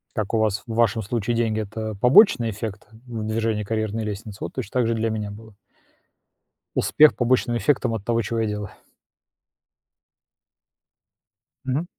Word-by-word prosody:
Как 110 -1 -3
у - - +3
вас, 110 -2 0
в 115 - -6
вашем 115 -1 +2
случае 115 +2 -2
деньги- 115 -2 0
это 110 +1 -4
побочный 125 - +5
эффект 110 -1 -6 0.2
в 115 -3 -5
движении 110 -1 -1
карьерной 110 0 -2
лестницы? 105 0 -6
Вот - - -8
точно 100 - -5
так 120 - +2
же 115 - +1
и - - -2
для 115 0 0
меня 105 -2 -3
было. 110 +1 -12 1.2
Успех 155 0 +5
побочным 120 -1 +1
эффектом 125 +1 +1
от 110 -3 -4
того, 115 +1 +1
чего 115 +2 -2
я 110 - 0
делаю. 105 -1 -4 2.9
Мгм. 135 +5 -1
110 Hz, 155 wpm, -23 LUFS, 105-115 Hz, 2.9 s, побочный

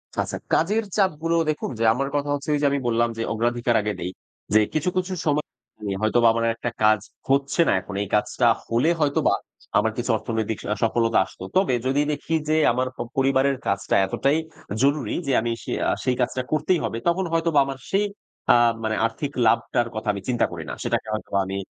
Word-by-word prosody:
আচ্ছা - - -2 0.2
কাজের 210 +7 +2
চাপগুলো 165 -4 +1
দেখুন 155 - -2
যে, - - +1
আমার 135 +3 -1
কথা 145 0 -1
হচ্ছে 145 +1 -4
ওইযে 145 -1 +2
আমি 140 - +1
বললাম 120 0 +2
যে 115 - -1
অগ্রাধিকার 120 +1 0
আগে 105 0 -2
দেই। 90 - -3 0.4
যে 110 - +7
কিছু, 155 +3 +1
কিছু 185 +1 -1
সময় 150 -1 +1 0.6
হয়তোবা 115 +2 +3
আমার 115 0 0
একটা 120 - -3
কাজ 110 0 +5 0.3
হচ্ছে 140 +4 +2
না - - +4
এখন। 100 - -8
এই - - -6
কাজটা 105 - +1 0.2
হলে 120 +7 +2
হয়তোবা 145 -2 +2 0.4
আমার - - +2
কিছু - - 0
অর্থনৈতিক 110 -1 -3
আ - - -4
সফলতা 115 0 +2
আসত। - - -17 0.2
তবে 190 -8 +3
যদি 135 +2 +2
দেখি 155 +2 -2
যে 155 - +3 0.2
আমার 130 +2 0
প - - -25 0.2
পরিবারের 135 0 +2
কাজটা 100 0 0
এতটাই 140 +9 +1 0.4
জরুরি 140 -4 +1
যে - - +1
আমি 120 +1 -1
সে - - -6 0.2
আ - - +3
সেই 125 - +1
কাজটা 125 +1 0
করতেই 155 +3 +2
হবে। 115 - -3
তখন 180 +2 +2
হয়তোবা 165 -2 +3
আমার 135 -1 -5
সেই 200 +2 +2 0.5
আ - - +6 0.3
মানে 110 0 0
আর্থিক 135 +5 -3
লাভটার 115 +2 +2
কথা 110 - -5
আমি 100 - -5
চিন্তা 120 -1 +2
করি - - -6
না। - - -4
সেটাকে - - -1
হয়তোবা 100 -2 -1
আমি 95 +1 -4
130 Hz, 195 wpm, -24 LUFS, 115-150 Hz, 0.6 s, যে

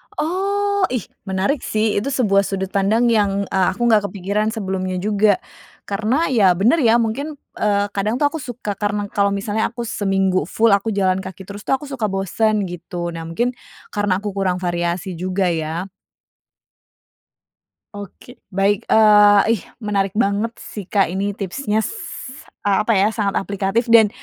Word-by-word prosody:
Oh, 400 +4 0
ih, 245 - -1 0.2
menarik 195 +9 0
sih, 215 -1 0
itu 225 - -5
sebuah 200 -6 +3
sudut 190 -1 -3
pandang 220 +5 +2
yang, 200 -2 +2
eee, 190 -1 +2
aku 240 - -10
nggak 210 -2 +4
kepikiran 200 +2 -2
sebelumnya 190 -3 -3
juga. 205 0 +2 0.4
Karena 220 +11 0
ya 195 -7 +5
bener, 235 - +3
ya, 230 -3 +4
mungkin, 280 +7 -3 0.2
eee, 205 -1 +2
kadang 205 +3 -1
tuh 290 - +4
aku 320 - -4
suka, 240 -6 -5
karena 205 -1 -1
kalau 200 0 +1
misalnya 205 +2 -1
aku 240 0 -7
seminggu 195 -5 0
full 225 +3 +2
aku 200 +2 +2
jalan 190 -1 +2
kaki 190 0 -8
terus, 200 +2 -10
tuh - - +2
aku 295 +2 -7
suka 265 -6 -2
bosen 205 +2 0
gitu. 175 0 -5
Nah, 165 -1 -6
mungkin 235 +10 0 0.4
karena 205 -2 0
aku 210 - -3
kurang 190 -2 -1
variasi 175 0 -2
juga, 185 0 0
ya? 165 +3 -3 2.0
Oke, 205 +5 -11
baik. 195 +1 0
Eee, 210 -2 +6
ih, 210 - -3 0.2
menarik 195 -2 0
banget 205 +1 +1
sih, 200 -4 -9
Kak, 200 -2 +3
ini 200 +2 -1
tipsnya, 215 - -2 0.7
eee, 200 -1 +3
apa 230 - 0
ya, 210 +3 +2
sangat 205 -3 -1
aplikatif, 200 +3 -1
dan 220 -3 +7
205 Hz, 160 wpm, -20 LUFS, 190-220 Hz, 2.0 s, dan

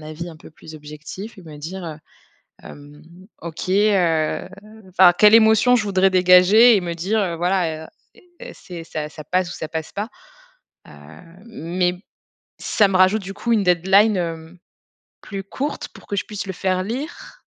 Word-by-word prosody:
avis 155 +3 -8
un 160 - -11
peu - - -15
plus 155 0 -14
objectif 155 +9 -10
et 190 - -13
me 155 -3 -12
dire 175 +4 -7
heu, 155 -2 -7 0.7
hem: 145 +1 -13 0.4
«OK 165 +1 -7
heu, 185 -6 +1 0.4
enfin, 180 -1 +5
quelle 210 +1 +7
émotion 220 +2 +5
je 230 - +1
voudrais 195 -1 +2
dégager?», 185 +6 +6
et - - -2
me 170 -1 -4
dire, 190 +6 -1
heu, 180 -5 -1
voilà: 170 -3 -1 0.3
«E - - -19 0.2
est - - -10
c'est 170 -2 -10
ça, 150 -2 -5
ça 155 0 -11
passe 180 +2 -1
ou - - -7
ça 155 - -5
passe 160 -1 -6
pas.». 210 +4 -5 0.8
Heu, - - -14 0.6
mais 180 -3 -2 0.7
ça 205 - +2
me 190 - -3
rajoute, 190 +3 +3
du 195 +1 -7
coup, 235 +3 -4
une 210 -3 +2
deadline, 190 +4 +3
hem, 165 0 -5 0.6
plus 195 -2 -7
courte 275 +9 -5
pour - - -17
que 200 - -3
je - - -1
puisse 205 -2 -7
le 190 - -4
faire 185 0 -1
lire 285 - -7
185 Hz, 180 wpm, -21 LUFS, 165-205 Hz, 0.8 s, quelle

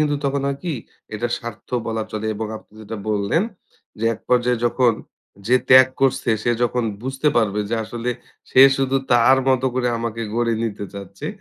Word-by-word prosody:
কিন্তু 150 -1 +2
তখন 140 0 0
হয় 140 0 -2
কি 175 - -1 0.4
এটা 120 +3 -2
স্বার্থ 120 -2 -9 0.2
বলা 110 -1 -2
চলে 110 0 -3
এবং 110 +1 -4
আপনি 110 - -16
যেটা 110 +1 -7
বললেন, 105 - +1 0.6
যে - - -1
এক - - -15
পর্যায়ে 125 -1 +2
যখন 120 0 +3 0.5
যে 125 +2 +5
ত্যাগ 130 0 +9
করছে 135 -2 +2
সে 120 - +1
যখন 120 0 +1 0.2
বুঝতে 135 +3 0
পারবে 105 -3 +2
যে - - +1
আসলে 120 +2 -4 0.4
সে 130 - +5 0.2
শুধু 135 0 +1 0.2
তার 120 +3 +5
মতো 130 0 +2
করে 125 -1 +1
আমাকে 115 0 -3
গড়ে 120 0 +1
নিতে 105 -2 -4
চাচ্ছে, 100 -1 -8
120 Hz, 180 wpm, -21 LUFS, 110-130 Hz, 0.6 s, ত্যাগ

